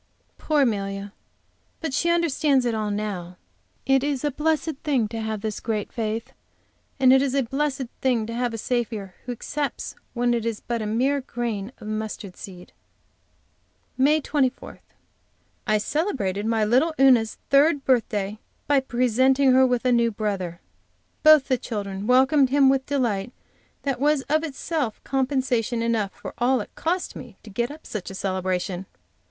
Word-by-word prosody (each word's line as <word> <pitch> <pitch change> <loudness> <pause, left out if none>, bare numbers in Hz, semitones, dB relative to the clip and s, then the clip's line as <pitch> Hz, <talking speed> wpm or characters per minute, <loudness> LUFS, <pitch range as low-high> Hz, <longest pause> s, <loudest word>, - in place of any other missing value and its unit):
Poor 300 -2 +2
Amelia! 200 -3 -2 0.7
But 320 -5 -4
she 340 +5 +1
understands 300 -6 +2
it 240 - +1
all 215 -1 -1
now. 200 -4 -4 0.5
It 270 0 +3
is 285 -2 -1
a 295 - +1
blessed 310 +1 0
thing 270 -8 +1
to 225 0 -4
have 220 -1 -3
this 215 -1 -3
great 215 -3 -3
faith, 225 +3 -3 0.7
and 260 -1 +6
it 265 - +6
is 275 -1 0
a 275 - +3
blessed 275 +2 -1 0.2
thing 245 -4 +1
to 230 - -6
have 245 0 -1
a 225 - -4
Saviour 220 -5 -2
who - - -2
accepts 280 +4 -3
it - - -23 0.2
when 240 0 +2
it 235 -2 0
is 230 -2 -2
but 235 -1 -3
a 215 - -3
mere 265 +6 +1
grain 235 -4 -4
of 215 - -12
mustard 215 -3 -5
seed! 180 -2 -11 1.2
MAY 295 +4 +3
24. 275 -3 -1 0.9
I 215 - +3
celebrated 210 - -1
my 225 -1 +2
little 265 +9 +2
Una's 250 -5 +5
third 285 +1 +4
birthday 215 -5 0 0.3
by 285 -1 +4
presenting 260 +2 +3
her 260 +1 +6
with 250 0 0
a 250 - +4
new 235 -1 +3
brother. 195 -5 -3 0.6
Both 310 -3 +7
the 255 -2 +1
children 200 -3 -4
welcomed 265 +2 +5
him 275 0 +5
with 265 0 +1
delight 240 -6 -1 0.5
that 275 -3 -1
was 290 0 +2
itself 305 -4 -1
compensation 255 -4 0
enough 225 -4 0
for - - -9
all 250 +2 +3
it 210 - -7
cost 355 +3 -2
me 235 -7 -10
to 215 - -11
get 235 +4 -1
up 305 +2 -11
such 210 -4 -5
a 190 - -8
celebration. 185 -1 -2
245 Hz, 165 wpm, -24 LUFS, 215-275 Hz, 1.2 s, Both